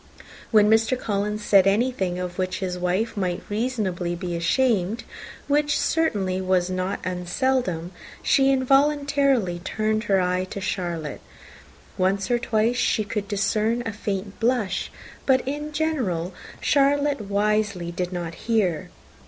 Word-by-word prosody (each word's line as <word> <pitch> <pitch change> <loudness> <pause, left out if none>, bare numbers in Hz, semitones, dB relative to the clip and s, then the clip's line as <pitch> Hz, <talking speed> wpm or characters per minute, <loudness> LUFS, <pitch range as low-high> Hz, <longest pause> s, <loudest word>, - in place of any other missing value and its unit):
When 210 -2 +5
Mr. 225 +3 +3
Collins 210 0 -2
said 195 -2 +5
anything 195 -4 +1
of 180 0 -5
which 185 0 -1
his 185 -2 -3
wife 180 +6 -1
might 180 -3 -2
reasonably 205 -6 -1
be 175 0 -4
ashamed, 210 +3 +1 0.4
which 295 0 +2
certainly 195 - 0
was 185 -1 +1
not 185 +1 -2 0.2
seldom, 185 -5 0 0.3
she 270 0 +4
involuntarily 275 -6 +2
turned 215 +4 -1
her 195 -2 +3
eye 180 0 0
on 200 - -4
Charlotte. 170 -5 -3 0.8
Once 190 +3 +1
or 240 - +3
twice 235 0 +1
she 225 -3 +2
could 205 0 -4
discern 215 +3 0
a 225 - -3
faint 200 -1 -4
blush; 225 -6 0 0.4
but 260 -1 +3
in 295 +2 -3
general 245 - -1 0.3
Charlotte 285 -1 +2
wisely 205 -3 0
did 180 +1 -3
not 175 -2 -4
hear. 190 -5 0
205 Hz, 130 wpm, -24 LUFS, 185-245 Hz, 0.8 s, When